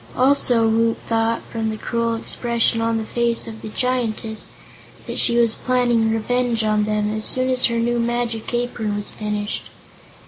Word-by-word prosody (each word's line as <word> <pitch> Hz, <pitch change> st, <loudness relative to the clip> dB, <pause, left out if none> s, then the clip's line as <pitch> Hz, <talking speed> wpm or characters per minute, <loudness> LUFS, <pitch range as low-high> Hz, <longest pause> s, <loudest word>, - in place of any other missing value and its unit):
Also 250 Hz, -3 st, +4 dB
Woot 225 Hz, +1 st, +2 dB
thought, 225 Hz, 0 st, 0 dB
from 225 Hz, -1 st, -2 dB
the 215 Hz, -, -4 dB
cruel 230 Hz, +1 st, -1 dB
expression 230 Hz, 0 st, +2 dB
on 230 Hz, 0 st, 0 dB
the 220 Hz, -, -3 dB
face 235 Hz, 0 st, +2 dB
of 220 Hz, -1 st, -8 dB
the 220 Hz, -, -7 dB
Giantess, 225 Hz, -2 st, -2 dB, 0.6 s
that -, -, -4 dB
she 235 Hz, -, +3 dB
was 230 Hz, -2 st, +3 dB
planning 240 Hz, -3 st, +1 dB
revenge 230 Hz, +1 st, 0 dB
on 215 Hz, -1 st, +1 dB
them, 210 Hz, 0 st, -1 dB
as 215 Hz, 0 st, -3 dB
soon 255 Hz, +3 st, +1 dB
as 255 Hz, 0 st, +3 dB
her 235 Hz, -1 st, 0 dB
new 240 Hz, +1 st, 0 dB
magic 235 Hz, -1 st, -2 dB
apron 240 Hz, -3 st, -2 dB
was 205 Hz, 0 st, -2 dB
finished. 210 Hz, 0 st, -4 dB
230 Hz, 170 wpm, -21 LUFS, 220-240 Hz, 0.6 s, Also